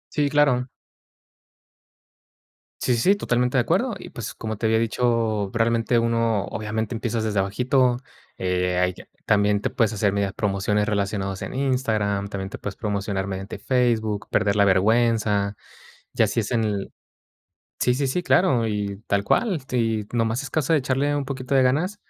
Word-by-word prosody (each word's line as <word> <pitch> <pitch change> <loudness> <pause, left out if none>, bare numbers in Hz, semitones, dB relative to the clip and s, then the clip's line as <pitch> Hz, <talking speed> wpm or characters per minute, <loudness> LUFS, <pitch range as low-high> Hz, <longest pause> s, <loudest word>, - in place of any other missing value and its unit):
Sí, 145 -1 +2
claro. 140 -4 +2 2.1
Sí, 125 - +2
sí, 115 - 0
sí - - +4
totalmente 125 -6 0
de - - +5
acuerdo. 210 - +1
Y, - - -10
pues, 120 +1 -6
como 110 -2 -5
te 115 - -3
había 110 0 +3
dicho, 115 -3 0
probablemente 115 +1 +2
uno, 115 -3 +1
obviamente, 110 +2 -3
empiezas 115 -1 -2
desde 105 -3 0
abajito. 125 +5 +2 0.4
Eh, 90 -1 0
ahí 90 0 +2 0.3
también 105 0 +2
te - - -1
puedes 115 -3 +1
hacer 100 -1 +1
medias 100 -1 -1
promociones 105 +1 0
relacionadas 100 -2 -2
en - - -6
Instagram. 110 -7 0
También 95 -1 -5
te - - -7
puedes 100 -1 -6
promocionar 100 -2 -2
mediante 95 +1 -5
Facebook, 110 -3 0
perder 105 -1 +1
la 100 - +5
vergüenza. 105 0 +2 0.6
Y - - +1
así - - 0
es - - -4
en 105 -5 -1 0.9
sí, 125 - +3
sí, 135 +1 0
sí, 180 +7 -1
claro, 130 -12 +3
y 100 -2 -2
tal 100 0 +1
cual, 185 - +1
si 115 -4 0
nomás 115 +1 0
es 135 - -7
caso 155 +1 0
de 155 - +4
echarle 135 +3 0
un 145 - -2
poquito 130 0 -4
de 135 - +5
ganas 155 +11 +1
110 Hz, 165 wpm, -23 LUFS, 100-125 Hz, 2.1 s, de